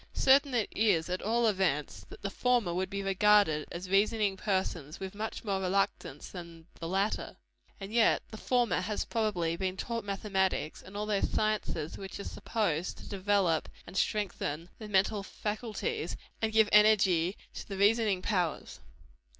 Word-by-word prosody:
Certain 275 0 +4
it 225 -3 +1
is, 195 -7 +2
at 180 - -2
all 235 +3 +1
events, 185 -9 0
that - - -12
the 200 - -2
former 240 -6 +1
would 185 +1 -1
be 200 0 -3
regarded 195 -5 +3
as 180 +2 -6
reasoning 200 +1 +2
persons 185 -7 -2
with 190 0 -6
much 215 +2 -5
more 195 -3 -1
reluctance 185 -6 -1
than 170 -3 -10
the 165 - -4
latter. 195 +4 -1 0.4
And 195 +2 -7
yet 230 -1 +4
the 220 - -7
former 240 -4 +1
has 210 +3 -2
probably 195 -8 0
been 185 +1 -2
taught 230 +2 -3
mathematics, 195 -5 -1
and 195 +2 -10
all 210 - -2
those 210 -2 0
sciences 210 -7 -1
which 195 0 -7
are - - -4
supposed 180 -8 -2
to - - -11
develope 195 -4 +1 0.2
and 180 - -11
strengthen 180 -6 -1
the 215 - -7
mental 200 +1 +2
faculties, 225 - -4 0.2
and 220 -1 +1
give 220 -1 +5
energy 200 -4 +5 0.2
to - - -8
the 195 - -5
reasoning 205 -2 +3
powers. 180 -7 -1
200 Hz, 160 wpm, -31 LUFS, 180-215 Hz, 0.4 s, give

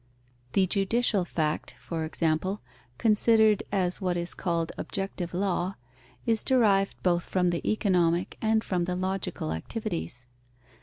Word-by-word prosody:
The 195 - +4
judicial 200 +1 +1
fact, 155 -3 -2
for 160 -2 -3
example, 165 +5 0 0.4
considered 220 -1 +4
as 185 -1 0
what 180 -2 0
is 175 0 -2
called 170 -2 -1
objective 195 -3 -4
law, 185 0 -1 0.5
is 225 -2 +1
derived 205 -7 +3
both 175 -1 +3
from 180 -2 +1
the 170 - -2
economic 180 -5 +1
and 220 0 +2
from 180 -2 0
the 180 0 -2
logical 185 - -2
activities. 85 - -4
185 Hz, 130 wpm, -28 LUFS, 170-205 Hz, 0.5 s, The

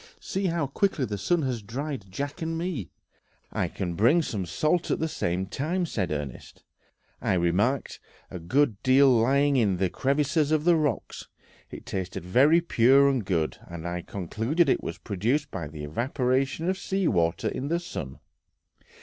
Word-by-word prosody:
See 195 0 -2
how 165 -3 0
quickly 140 0 0
the 105 -3 -4
sun 165 - +1
has 125 -4 -2
dried 130 +1 -5
Jack 140 - -5
and 165 0 -2
me." 165 - -3 0.6
"I - - 0
can 90 -2 -4
bring 120 - +4
some 100 - -3
salt 155 - 0
at - - +1
the 160 - -1
same 90 - -2
time," 165 - -2
said 95 - -2
Ernest. 70 -5 -6 0.6
"I - - +1
remarked 95 +10 0 0.3
a 90 - -6
good 110 - +1
deal 135 +1 +5
lying 135 +4 +3
in 100 -6 +2
the 95 -1 0
crevices 145 +3 +1
of 155 -1 +2
the 175 0 +5
rocks; 150 -7 -2 0.4
it - - -10
tasted 95 -2 -4
very 140 - +5
pure 135 -2 +5
and 130 -5 0
good, 85 -5 -1
and 85 0 -7
I 90 0 -3
concluded 115 - -1
it - - +2
was - - -5
produced 120 +9 -1
by 85 -5 -4
the 75 0 -8
evaporation 130 - -1
of 190 +1 0
sea 195 -2 -1
water 85 -4 +1
in 135 - -4
the 170 +3 0
sun." 70 - -6
130 Hz, 170 wpm, -27 LUFS, 95-155 Hz, 0.6 s, deal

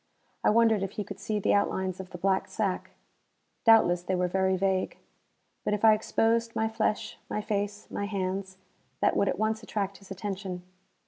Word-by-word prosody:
I - - +5
wondered 225 -2 +4
if 195 0 -3
he 210 - -3
could 200 - -9
see 215 - -2
the 205 - +2
outlines 190 -2 0
of 190 -1 -7
the 180 - -8
black 190 +1 +1
sack. 200 -4 -2 0.7
Doubtless 220 -6 +6
they 185 +1 -1
were 180 0 +1
very 190 +1 +1
vague. 190 0 0 0.7
But 210 - +1
if 210 - +1
I 220 - +9
exposed 230 +1 +1
my 220 - +1
flesh, 220 -1 -1
my - - -1
face, 205 -1 -2
my 205 - -2
hands, 190 -1 -3 0.4
that - - +3
would 200 - +2
at - - -1
once 220 +1 0
attract 200 -3 -3
his 195 - -17
attention. 190 -2 -5
200 Hz, 185 wpm, -28 LUFS, 190-215 Hz, 0.7 s, I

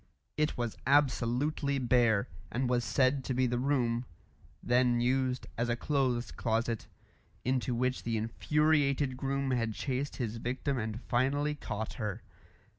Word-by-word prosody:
It 150 0 0
was 120 -2 -2
absolutely 140 +1 +2
bare, 120 -5 +3 0.2
and 125 +2 0
was 120 -1 +1
said 130 +1 +2
to 130 - -1
be 130 +1 +3
the 120 0 0
room 125 -3 +1 0.6
then 120 0 +3
used 130 +1 +1
as 120 +1 +1
a 120 - +2
clothes 125 -3 0
closet 115 -1 -1 0.6
into 125 -1 0
which 125 +2 0
the 115 -1 -1
infuriated 140 +3 +1
groom 135 +1 -1
had 115 -3 0
chased 135 +1 -2
his 115 -3 -3
victim 130 +3 -2
and 110 +1 -4
finally 140 +4 +1
caught 110 -7 -5
her. 105 -3 -3
125 Hz, 140 wpm, -31 LUFS, 120-135 Hz, 0.6 s, bare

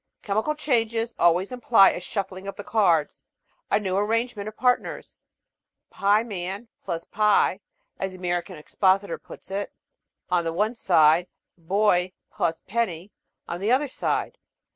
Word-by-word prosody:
Chemical 220 +9 0
changes 230 -5 0
always 175 +4 +3
imply 240 -5 +5
a - - -5
shuffling 190 -1 -5
of 200 - -5
the 205 - -8
cards, 175 -9 +1 0.5
a 205 - +3
new 190 -3 -2
arrangement 215 +1 -1
of 215 - -8
partners. 250 +1 -1 0.7
"Pieman 200 0 0 0.2
+ 165 -1 -4
pie," 210 -1 +3 0.4
as 190 - -2
the - - -10
American 175 0 -2
expositor 190 +5 +1
puts - - -13
it, 200 +1 -3 0.6
"on 175 -1 +2
the 165 0 -2
one 210 +6 0
side; 170 -5 +4 0.3
Boy 185 +1 +1 0.3
+ 165 -1 -1
penny 195 -4 -2 0.4
on 170 - -4
the 205 +4 0
other 275 +3 +3
side." 485 - -2
200 Hz, 140 wpm, -25 LUFS, 180-225 Hz, 0.7 s, imply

